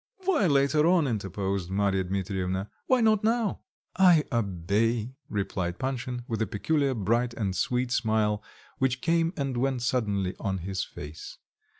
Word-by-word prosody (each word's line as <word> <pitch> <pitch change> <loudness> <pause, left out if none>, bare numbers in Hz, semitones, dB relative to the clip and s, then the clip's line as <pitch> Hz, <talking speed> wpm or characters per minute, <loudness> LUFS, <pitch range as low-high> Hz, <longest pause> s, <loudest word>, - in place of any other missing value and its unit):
"Why 325 - +3
later 140 +1 +3
on?" 175 -3 +4
interposed 100 -5 -2
Marya 95 -1 +1
Dmitrievna, 95 0 -2 0.2
"why 255 -1 +4
not 215 -2 +3
now?" 225 -2 +1 0.4
"I 180 -5 +6
obey," 110 +2 0 0.2
replied 95 -4 -2
Panshin, 125 -2 -3
with 115 -4 -2
a 110 - +1
peculiar 140 +6 0
bright 120 +3 0
and 100 -4 -2
sweet 125 +6 0
smile, 110 -3 +1 0.4
which 130 -1 +1
came 165 0 +2
and 135 -3 -2
went 130 -1 0
suddenly 105 -7 0
on 95 -1 -1
his 95 -1 -2
face. 75 +2 -9
115 Hz, 140 wpm, -27 LUFS, 100-140 Hz, 0.4 s, I